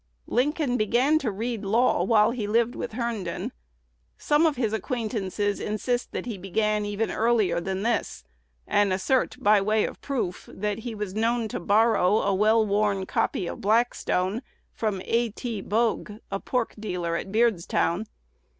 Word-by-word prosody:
Lincoln 275 0 0
began 245 +8 +3
to 265 - -1
read 220 +2 -3
law 220 -1 +2
while 210 +2 +4
he 230 -4 -3
lived 230 +3 +2
with 235 - -5
Herndon. 225 -7 -3 0.7
Some 300 +3 +3
of 305 - 0
his 225 -4 -1
acquaintances 215 -4 -2
insist 245 +4 -2
that - - -4
he 225 -6 -5
began 210 +3 0
even 205 +2 -1
earlier 215 -7 +2
than 190 +2 -3
this, 230 -1 -1 0.4
and 205 -1 +2
assert, 195 +8 +1
by 210 0 +4
way 215 +2 +2
of - - -7
proof, 240 -10 -3
that 210 +1 -3
he 225 0 -6
was 205 -3 -4
known 230 +2 +1
to - - -4
borrow 210 +1 +3
a 200 - +1
well 215 +3 +4
worn 200 -1 +1
copy 185 - -1
of 205 - -6
Blackstone 215 -2 +1 0.3
from 205 -4 -2
A. 235 0 +1
T. 225 -1 -5
Bogue, 220 +1 0 0.2
a 195 - -1
pork 250 +1 -1
dealer 180 -5 -2
at 190 +3 -4
Beardstown. 215 -3 +1
215 Hz, 160 wpm, -26 LUFS, 200-235 Hz, 0.7 s, while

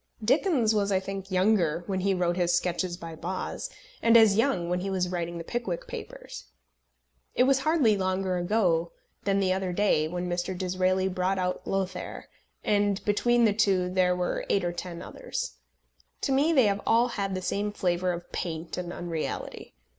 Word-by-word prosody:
Dickens 260 - +3
was, 205 -1 +1
I 190 - +3
think, 195 0 -6
younger 185 -4 +2
when 190 -2 -2
he 195 +1 +1
wrote 175 -1 +1
his 175 -1 +2
Sketches 175 0 -1
by 165 -2 -8
Boz, 175 +4 -4 0.3
and 230 0 +6
as 220 -3 +6
young 225 -7 +1
when 180 +1 0
he 195 +2 -3
was 185 -2 0
writing 170 -1 -3
the 165 - -5
Pickwick 195 -3 -3
Papers. - - -8 0.9
It - - +5
was 270 +1 +4
hardly 270 -7 +3
longer 185 -1 0
ago 175 -3 +1 0.3
than 200 0 +2
the 185 -1 +2
other 190 -1 -2
day 175 -5 +2
when 175 +2 -3
Mr. 175 +1 -2
Disraeli 185 +1 +1
brought 185 +1 0
out 180 -1 -2
Lothair, 190 -1 -3 0.4
and 205 -1 +1
between 240 +3 +3
the 210 - +3
two 195 -4 +2
there 180 -1 +3
were 180 0 -1
eight 195 - +2
or 175 - 0
ten 175 -1 -6
others. - - -5 0.6
To 275 - 0
me 280 +5 +3
they 265 -7 +5
have 200 0 +1
all 235 +2 +4
had 195 -4 -2
the 185 - -3
same 205 +2 -1
flavour 180 -2 0
of 175 0 -7
paint 165 -1 -4
and 175 -1 -5
unreality. 165 - -5
185 Hz, 180 wpm, -27 LUFS, 175-210 Hz, 0.9 s, and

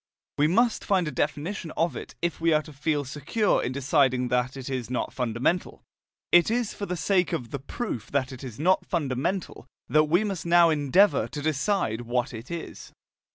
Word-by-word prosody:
We 150 - +5
must 230 +7 +2
find 185 -4 +1
a - - -2
definition 155 +7 -2
of 165 +1 +1
it, - - -8
if 170 -1 -1
we 165 -1 +3
are 155 0 +2
to 155 - -12
feel 145 0 -1
secure 150 - 0
in 125 - -2
deciding 130 -2 +2
that 125 +2 0
it 130 - -7
is 130 -4 -3
not 125 - -2
fundamental. 125 +8 -1 0.5
It 175 +2 +6
is 235 -1 0
for 200 - -5
the 180 - -3
sake 180 +2 +1
of 120 -3 -3
the 140 - -3
proof 130 - -5
that 135 -2 -1
it 130 0 -9
is 125 -3 -8
not 185 +5 +3
fundamental 170 +4 -2 0.2
that 155 0 +4
we 175 +7 +2
must 195 -6 -3
now 170 -1 +5
endeavour 155 +7 +3
to 150 - -6
decide 155 - 0
what 120 +2 -2
it 115 +2 -8
is. 170 -1 -7
150 Hz, 195 wpm, -26 LUFS, 130-175 Hz, 0.5 s, It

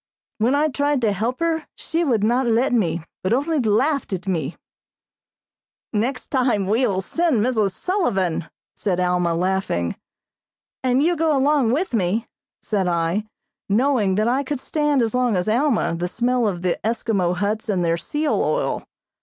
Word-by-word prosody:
When 240 +6 +3
I 300 +2 +3
tried 285 0 0
to 220 -3 +2
help 230 - -2
her 325 -2 0
she 330 +1 -1
would 235 -9 +1
not 240 +3 +2
let 235 +3 +2
me, 170 -8 +1 0.2
but 185 - 0
only 295 +5 +1
laughed 260 +6 +1
at 185 -1 -4
me." 165 -5 -2 1.4
"Next 240 +5 -2
time 245 -7 +1
we 225 +6 +2
will 190 -3 -1
send 310 - +1
Mrs. 215 -6 +1
Sullivan," 190 - -1 0.3
said 185 -4 -1
Alma, 180 -2 +1
laughing. 180 - -1 0.9
"And 255 +2 +2
you 345 +2 +2
go 315 -2 +2
along 275 -3 +3
with 325 +1 -1
me," 215 +2 0 0.4
said 195 -4 0
I, 170 +5 0 0.4
knowing 220 -3 +2
that 215 +2 +1
I 255 +3 +2
could 280 0 -3
stand 295 -2 +1
as 225 - -1
long 250 -3 +2
as 180 +1 -1
Alma 240 - +2
the 175 +1 -2
smell 240 +4 +1
of 180 -3 -3
the 180 - 0
Eskimo 215 -5 0
huts 210 +4 -2
and 185 -4 +1
their 165 0 +2
seal 295 - -1
oil. - - -1
225 Hz, 165 wpm, -22 LUFS, 190-275 Hz, 1.4 s, When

